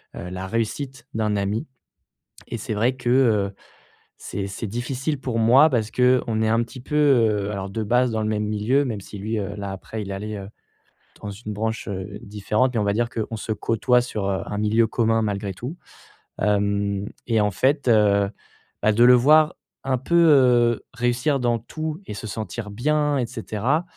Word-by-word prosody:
heu, 90 - -6
la 95 +1 -5
réussite 115 +6 -3
d'un 110 -1 0
ami 105 +8 -1 0.8
et 115 - -4
c'est 110 +1 -4
vrai 120 +5 +1
que, 125 -2 -4
heu, 110 -6 +3 0.6
c'est 100 -1 -5
c'est 100 +3 -5
difficile 130 +6 -3
pour 125 -3 -2
moi 125 +7 +6
parce 115 -6 -1
qu'on 125 -3 +2
est 110 - +2
un 115 +1 +3
petit 120 +2 -8
peu, 140 - -7
heu, 115 -9 +3
alors 100 -2 -4
de 110 +3 -3
base 125 +4 +2
dans 110 -1 -1
le 110 - -1
même 105 0 -1
milieu, 110 +7 +1
même 110 -5 -4
si 100 - -10
lui, 110 +3 -3
heu, 100 0 -4
là, 100 -1 -5
après, 105 +3 -7
il 100 -2 -6
est - - -3
allé, 105 +2 -5
heu, 100 -1 -7 0.7
dans 105 - -5
une 105 +2 -7
branche, 110 +2 -3
heu, 100 +1 -5
différente 105 +5 0
mais 115 - +1
on - - 0
va 100 - +1
dire 120 +3 0
qu'on 115 -1 -4
se 110 +1 -3
côtoie 115 +3 +2
sur, 110 -5 -3
heu, 95 -1 -1
un 105 - -5
milieu 110 +2 +2
commun 115 0 +1
malgré 100 -2 -2
tout, 125 - -6 0.7
hem 100 0 0 0.2
et 115 -2 +2
en 105 0 +1
fait, 130 +7 +1
heu, 100 -3 +4 0.5
bah, 110 - +3
de 115 +3 +4
le 125 +1 +8
voir 150 +6 +5 0.3
un 135 -1 0
peu, 135 +7 -2
heu, 120 -5 +4
réussir 125 +4 0
dans 120 -1 +1
tout 155 +7 -5
et - - -6
se 105 +2 -6
sentir 110 0 -5
bien 150 +6 +1
et 125 - 0
cetera, 120 - -1
110 Hz, 200 wpm, -23 LUFS, 105-125 Hz, 0.8 s, le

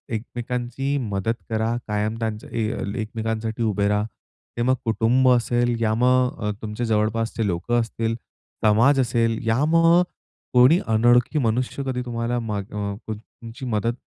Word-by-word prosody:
एकमेकांची 125 +4 -3
मदत 110 -3 -1 0.2
करा. 110 +1 0
कायम 105 +1 -1
त्यांच्या 110 -2 -4
अ, 110 -1 -2
एकमेकांसाठी 110 0 -3
उभे 105 -2 +1
रहा. 105 0 +1 0.5
ते - - -1
मग 130 +2 +3
कुटुंब 115 +3 +3
असेल, 120 0 +2
या 110 -1 +2
मग 125 +1 +3
अ, - - +1
तुमचे 110 +2 -3
जवळपासचे 110 +1 0
लोकं 95 +7 0
असतील, 115 0 -2 0.5
समाज 120 +7 +5
असेल 115 -2 +1
यामग 165 +8 +4 0.5
कोणी 130 +7 +6
अनोळखी 120 +6 +3
मनुष्य 125 +3 -1
कधी 130 -2 -2
तुम्हाला 120 0 -2
मग 105 -3 -4
अ, 100 -1 -3
तुम 110 -1 -3 0.2
तुमची 120 +3 -8
मदत 115 -1 0
115 Hz, 140 wpm, -23 LUFS, 110-125 Hz, 0.5 s, कोणी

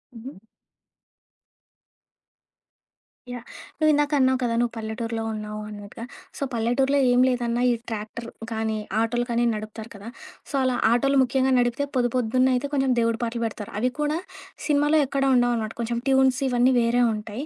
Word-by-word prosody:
హుహు. 230 -3 -10 2.9
యాహ్! 245 -1 -6 0.4
నువ్విందాక 295 -1 +3
అన్నావు 260 0 +3
కదా, 235 - 0
నువ్వు 240 -1 0
పల్లెటూరిలో 225 +1 -4
ఉన్నావు 210 0 -6
అన్నట్టుగా. 210 +2 -9 0.3
సో, - - -3
పల్లెటూరిలో 255 +5 +1
ఏం 245 0 +4
లేదన్నా 240 -1 -1
ఈ - - +3 0.2
ట్రాక్టర్ 225 +1 -6 0.2
కానీ, 220 -1 -1 0.2
ఆటోలు 240 +2 0
కానీ 235 +1 +1
నడుపుతారు 215 +1 -7
కదా. 200 +2 -11 0.4
సో, - - -11
అలా 255 -1 +1 0.2
ఆటోలు 275 +3 +2
ముఖ్యంగా 260 +1 +1
నడిపితే 245 +3 0
పొదుపొద్దున్న 250 +1 +2
అయితే 280 +3 -2
కొంచెం 270 -2 +2
దేవుడి 230 0 +1
పాటలు 235 0 -2
పెడతారు. 210 -2 -6
అవి 250 +2 +1
కూడా 300 +2 0 0.5
సినిమాలో 295 +1 +3
ఎక్కడా 275 0 0
ఉండవనమాట. 235 -3 +1
కొంచెం 235 0 -2
ట్యూన్స్ 265 -1 +3
ఇవన్నీ 250 +1 +3
వేరే 235 +1 +2
ఉంటాయి. 215 +5 -6
240 Hz, 140 wpm, -24 LUFS, 225-260 Hz, 2.9 s, ఏం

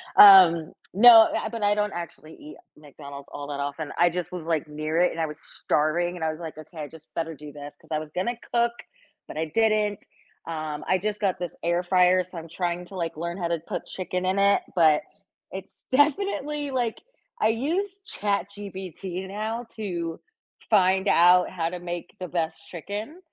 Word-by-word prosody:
Um, 180 -5 +8 0.2
no, 225 +2 +9
I 220 - -3
but 230 -1 -6
I 205 0 +3
don't 210 -1 0
actually 170 -2 -8
eat 150 - -11 0.2
McDonald's 140 -1 -11
all 145 0 -7
that 145 -1 -5
often. 145 +2 -4
I 175 0 +5
just 180 0 -4
was, 175 -3 -5
like, 160 -2 -1
near 155 +2 -3
it 180 - +4
and 165 - -7
I - - +2
was 150 0 -8
starving 175 +4 -1
and 165 - -6
I 160 - +1
was 155 - -9
like, 160 -2 -7
"Okay, 155 +2 -12
I 150 -1 -5
just 160 0 -15
better 165 0 -2
do 150 0 -11
this," 145 0 -10
'cause - - -22
I 155 - 0
was 155 -1 -8
gonna 230 +6 -1 0.2
cook, 235 0 +3 0.6
but - - -9
I 160 - 0
didn't, 215 -2 +2 0.5
um, 155 -2 -4
I 185 - +3
just 210 +2 -3
got 195 -3 0
this 175 -2 -5
air 175 +1 +1
fryer, 180 0 +4
so 180 -1 -12
I'm 165 0 -8
trying 175 +1 -3
to, 190 - -12
like, 165 -3 -3
learn 170 +2 -4
how 175 -2 -2
to 170 -1 0
put - - -4
chicken 185 0 -4
in 190 +2 +1
it, 200 0 +4
but 155 -3 +5 0.5
it's 190 0 -8 0.2
definitely, 295 -1 +1
like 240 -4 -1 0.4
I 215 - +4
use 360 - -1
ChatGPT 190 -2 -4
now 220 +4 -4
to 170 -6 -4 0.5
find 190 -1 +3
out 180 +1 +5
how 165 -2 -2
to 180 0 -6
make 175 0 -6
the 180 - -5
best 160 -1 -3
chicken, 205 - -6
180 Hz, 195 wpm, -25 LUFS, 160-205 Hz, 0.6 s, no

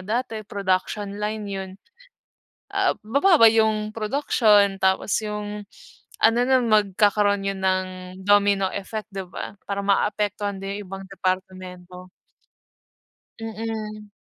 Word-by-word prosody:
dati 225 +1 -3
production 200 0 -2
line 210 +1 -3
yun, 195 -1 -5 1.0
ah, - - +1
bababa 280 - +5
yung 220 -1 +3
production 210 -4 +2
tapos 190 +3 +2
yung 210 0 -5 0.6
ano 225 +1 +5
na 260 +1 +4
magkakaroon 205 -1 +2
yun 195 -1 -3
ng 185 0 +1 0.4
domino 200 -1 +4
effect, 210 +2 -5
di 195 - -3
ba, - - -7 0.2
parang 200 0 -2
maapektuhan 205 0 0
din 200 +1 -4
yung - - -8
ibang 195 0 -7
departamento. 185 -1 -5 1.3
Mm. 215 -1 -6
205 Hz, 110 wpm, -23 LUFS, 195-215 Hz, 1.3 s, bababa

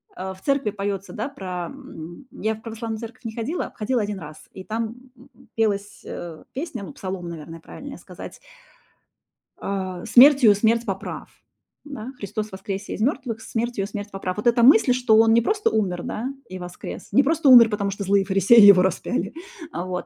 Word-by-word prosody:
э, 190 - -5
в 190 - -20
церкви 275 -5 +1
поётся, 200 -1 -4
да, 230 +4 -3
про 185 -9 -5
м. 260 - -11
Я 220 +1 -2
в 220 - -16
православную 225 -1 -5
церковь 240 +2 -10
не 220 - -4
ходила, 265 +10 -3
ходила 235 +3 0
1 205 -1 -4
раз, 155 -2 -10 0.2
и 190 - -9
там, 225 +2 -3 0.2
м, 260 +3 -20
пелась, 205 -2 -1
э, 170 -2 -8
песня, 270 -6 -5
ну, - - -9
псалом, 185 -2 -6
наверное, 165 0 -9
правильнее 275 - -10
сказать - - -11 1.2
э, 185 -2 -4
"Смертью 255 -5 +7
смерть 230 +3 +2
поправ", 195 -4 -5 0.5
да? 265 -4 -8
"Христос 210 +1 -5
воскресе 195 +1 -5
из - - -5
мёртвых, 245 -3 -1
смертью 230 -3 -2
смерть 205 -1 -7
поправ". 195 0 -4
Вот 210 - -1
эта 235 0 +4
мысль, 250 -1 +6
что 245 -3 +3
он 225 0 +5
не 235 - +5
просто 420 - +1
умер, 185 -5 -1
да, 220 - -4 0.2
и 185 0 -7
воскрес, 180 0 -8
не 275 - +5
просто 310 -1 +2
умер, 235 -3 +9
потому 205 -2 -1
что 200 +1 -5
злые 195 0 +2
фарисеи 195 +4 +6
его 200 -3 +9
распяли. 190 0 -1 0.4
Вот. 180 +1 -4
215 Hz, 180 wpm, -23 LUFS, 190-240 Hz, 1.2 s, умер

